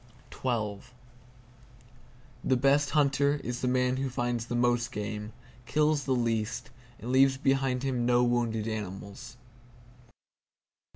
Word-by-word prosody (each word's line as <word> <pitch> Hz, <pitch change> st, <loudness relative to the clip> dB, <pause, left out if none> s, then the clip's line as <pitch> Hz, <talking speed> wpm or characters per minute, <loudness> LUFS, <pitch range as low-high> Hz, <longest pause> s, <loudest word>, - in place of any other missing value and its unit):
The 110 Hz, -6 st, -1 dB, 1.8 s
best 140 Hz, +2 st, +3 dB
hunter 140 Hz, -1 st, +3 dB
is 125 Hz, 0 st, -4 dB
the 125 Hz, -, 0 dB
man 125 Hz, 0 st, +2 dB
who 135 Hz, 0 st, -1 dB
finds 120 Hz, -2 st, -2 dB
the 120 Hz, -, -3 dB
most 120 Hz, 0 st, +1 dB
game, 105 Hz, -1 st, -4 dB, 0.4 s
kills 150 Hz, -2 st, +2 dB
the 130 Hz, -1 st, +1 dB
least, 115 Hz, -1 st, -1 dB, 0.3 s
and 120 Hz, -, -5 dB
leaves 135 Hz, 0 st, +5 dB
behind 135 Hz, -2 st, +1 dB
him 130 Hz, -3 st, 0 dB
no 120 Hz, 0 st, +3 dB
wounded 120 Hz, -3 st, 0 dB
animals. 105 Hz, +3 st, -6 dB
125 Hz, 115 wpm, -29 LUFS, 115-135 Hz, 1.8 s, leaves